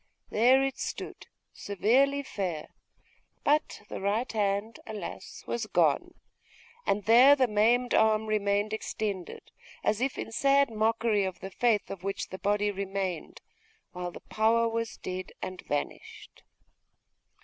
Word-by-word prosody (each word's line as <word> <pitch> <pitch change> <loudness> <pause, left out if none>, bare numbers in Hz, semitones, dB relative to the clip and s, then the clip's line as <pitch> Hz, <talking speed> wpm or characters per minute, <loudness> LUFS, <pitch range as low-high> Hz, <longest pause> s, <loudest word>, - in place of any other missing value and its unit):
There 255 +5 +5
it 270 0 -2
stood - - -6 0.3
severely 265 +8 +2
fair; 185 - -4 0.7
but 295 -7 +1
the - - -6
right 210 +6 0
hand, 205 +1 -1
alas! 210 -5 -7
was 235 -2 -3
gone; - - +2 0.7
and 200 -1 +1
there 250 +6 +8
the 260 -3 +3
maimed 235 +3 +2
arm 220 0 +4
remained 205 0 0
extended, 205 -4 -4 0.3
as 215 +2 +1
if 265 +1 -1
in - - -5
sad 275 +2 +3
mockery 220 -1 +1
of 190 -1 -4
the 190 0 -7
faith 225 -1 +1
of 190 -2 -7
which 195 0 -3
the 190 - -7
body 205 +1 +1
remained, 195 -3 -4 0.5
while 180 0 -4
the - - -11
power 230 +2 +2
was 230 0 -3
dead 185 0 -6
and 185 -1 -6
vanished. 145 0 -5
215 Hz, 135 wpm, -29 LUFS, 195-230 Hz, 0.7 s, there